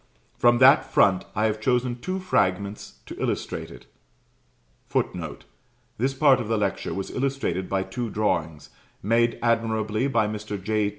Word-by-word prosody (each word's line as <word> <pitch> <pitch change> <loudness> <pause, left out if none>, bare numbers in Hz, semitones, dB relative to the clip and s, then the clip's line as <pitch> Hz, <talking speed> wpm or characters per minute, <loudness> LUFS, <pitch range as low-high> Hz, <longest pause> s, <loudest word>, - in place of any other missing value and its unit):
From 120 0 +4
that 130 +3 +6
front 95 -2 +3
I 105 - +1
have 110 0 -1
chosen 125 0 0
two 185 +9 -3
fragments 100 - -1
to - - -8
illustrate - - -3
it. - - -13 1.0
[Footnote: - - -3 0.5
This 135 +3 0
part 135 -1 +5
of 120 - -4
the 110 0 0
lecture 100 -2 -2
was 95 0 -4
illustrated 130 -9 -2
by 95 -1 0
two 120 +3 -4
drawings, 85 -8 -2 0.3
made 115 +3 +2
admirably 110 0 0
by 115 -6 +2
Mr. 105 -1 -5
J. 105 +1 0
110 Hz, 145 wpm, -25 LUFS, 100-125 Hz, 1.0 s, that